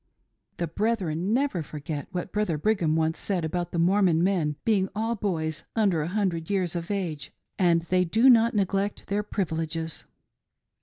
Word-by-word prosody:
The 170 - -1
brethren 185 -1 -1
never 255 -7 +1
forget 150 -1 -6
what 180 -1 -4
Brother 210 -7 0
Brigham 170 -3 +1
once 160 0 0
said 185 -5 -1
about 175 +1 -3
the - - -3
Mormon 175 -1 +3
men 175 -6 +1
being 200 -4 +2
all 225 +2 0
boys 160 -7 -2
under 195 -8 +2
a 150 - -2
hundred 180 -4 -1
years 185 -4 0
of 170 -1 -4
age, 180 -7 -3 0.3
and 170 -3 +3
they 180 +1 +2
do 220 +9 +3
not 230 -2 +6
neglect 200 0 0
their 205 +1 +1
privileges. 165 -5 -3
180 Hz, 160 wpm, -26 LUFS, 160-205 Hz, 0.3 s, not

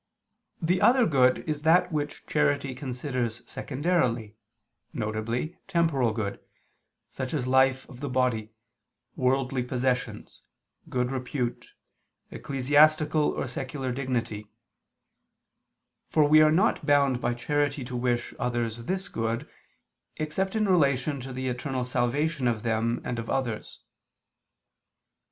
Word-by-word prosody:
The 175 +3 +1
other 250 0 +5
good 130 -5 +3
is 150 -2 -2
that 165 +4 +4
which 150 -1 -3
charity 145 -3 +1
considers 125 -2 -3
secondarily, 130 -8 -1 0.6
viz. 110 +6 -2 0.2
temporal 165 - +2
good, 110 -3 -3 0.7
such 130 +3 -4
as 130 -4 -1
life 130 0 +3
of 125 - -12
the 145 0 -4
body, 125 -4 0 0.7
worldly 130 0 +1
possessions, 125 0 -2 0.5
good 125 0 -1
repute, 125 -1 -4 0.6
ecclesiastical 150 +3 +3
or - - -2
secular 130 +1 -4
dignity, 120 -5 -3 1.6
for 155 - +4
we 155 +1 +7
are 155 - +6
not 185 +2 +2
bound 140 -4 +3
by 120 0 0
charity 145 +2 -1
to 125 0 -6
wish 120 -1 -1
others 120 -2 -1
this 190 +4 -2
good, 115 - -2 0.7
except 190 +6 -2
in 215 -1 +2
relation 140 -5 +2
to 130 +1 -7
the 130 +1 -4
eternal 125 0 -2
salvation 130 +3 0
of 115 -3 -1
them 115 +1 0
and 120 -1 -3
of 115 - -6
others. 125 -5 -3
130 Hz, 120 wpm, -27 LUFS, 120-150 Hz, 1.6 s, we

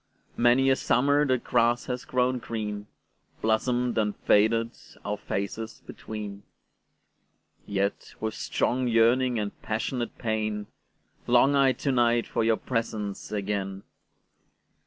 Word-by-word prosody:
Many 125 +3 +4
a - - +5
summer 145 +4 +2
the 130 -1 +3
grass 120 0 +1
has 125 -1 -4
grown 125 0 +1
green, 105 -4 -4 0.6
Blossomed 120 +2 +1
and 105 -1 0
faded, 115 +2 +3 0.3
our 105 0 -1
faces 105 +2 -5
between:Yet, 100 -1 -7
with 110 0 -2
strong 125 +1 0
yearning 120 +2 +3
and 105 -2 -4
passionate 120 +2 -3
pain, 110 -2 -2 0.6
Long 125 +3 +5
I 135 -2 +4
to 140 - -1
night 120 -2 +3
for - - -1
your 110 0 +3
presence 110 -5 -3
again. 100 -1 -3
115 Hz, 115 wpm, -27 LUFS, 105-125 Hz, 0.6 s, a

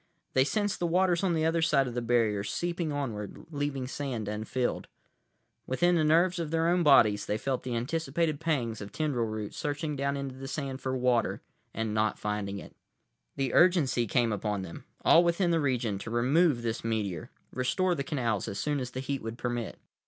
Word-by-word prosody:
They 130 - +5
sensed 205 +7 -1
the 175 - 0
waters 180 +1 +2
on 180 -3 +2
the 160 0 +1
other 165 +1 +2
side 150 -5 +3
of 120 - -5
the 120 - -2
barrier 115 -4 +1
seeping 170 - -2
onward, 115 -8 -4
leaving 145 -3 -2
sand 130 -6 -4
unfilled. 110 +4 -2 0.8
Within 175 +7 +2
the 165 -2 +3
nerves 170 +4 +3
of 165 -3 -2
their 165 +1 +1
own 180 +1 +3
bodies 110 -9 +5
they 105 - 0
felt 130 +3 -2
the 125 -2 -3
anticipated 150 +4 -1
pangs 120 -9 -1
of 100 - -7
tendril 140 -7 -1
roots 110 -1 -5
searching 150 +1 -2
down 140 0 -1
into 140 -1 -4
the 135 +1 -8
sand 135 -2 -4
for 130 0 -1
water, 125 -2 +1 0.3
and 110 -1 -2
not 110 0 +1
finding 105 -1 -3
it. - - -10 0.6
The 135 -3 -1
urgency 150 -10 +4
came 115 0 +2
upon 105 -1 -2
them, 85 - -9 0.2
all 170 - +7
within 170 +1 +2
the 165 - +3
region, 120 -7 0
to 105 - -6
remove 130 +3 +3
this 115 0 -2
meteor; 105 -7 -2 0.2
restore 180 +9 +1
the 140 -5 -2
canals 120 - -1
as 100 - -4
soon 145 +5 -1
as 125 -2 -4
the 130 - -5
heat 135 +1 -3
would 115 +1 -6
permit. 120 -2 -3
130 Hz, 195 wpm, -29 LUFS, 115-160 Hz, 0.8 s, all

